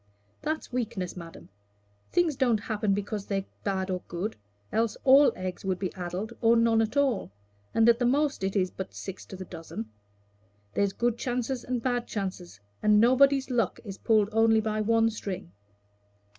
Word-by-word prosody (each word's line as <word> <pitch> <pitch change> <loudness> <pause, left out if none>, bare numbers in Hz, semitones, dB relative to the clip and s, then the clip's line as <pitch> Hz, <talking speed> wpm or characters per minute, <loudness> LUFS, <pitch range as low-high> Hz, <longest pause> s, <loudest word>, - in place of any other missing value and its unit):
"That's 310 -4 -3
weakness, 220 -7 -3
madam. 170 -2 -10 0.6
Things 345 -4 +2
don't 245 -4 +2
happen 210 -2 0
because 205 0 -4
they're 195 -1 -1 0.2
bad 190 -1 -1
or 180 -1 -2
good, 180 +6 -3 0.4
else 225 -1 0
all 275 +2 +7
eggs 185 -1 -5
would 190 -2 0
be 185 0 -3
addled 185 +5 -4
or 230 0 +5
none 230 -1 +4
at 225 +5 -1
all, 270 - +1 0.4
and 225 0 +4
at 235 0 +5
the 245 - +2
most 280 -3 +1
it 195 +1 -1
is 185 -2 +1
but 190 - -7
six 195 -1 -7
to - - -8
the 185 0 -7
dozen. 115 -11 -7 0.8
There's 200 -1 +1
good 235 +2 0
chances 245 0 -2
and 250 -2 -3
bad 245 -2 0
chances, 185 - -5 0.2
and 210 0 +5
nobody's 265 +3 +4
luck 230 -6 0
is 195 -2 -7
pulled 215 -2 +3
only 225 0 +4
by 215 0 -1
one 225 +1 +3
string." 195 - -6
220 Hz, 170 wpm, -28 LUFS, 190-240 Hz, 0.8 s, all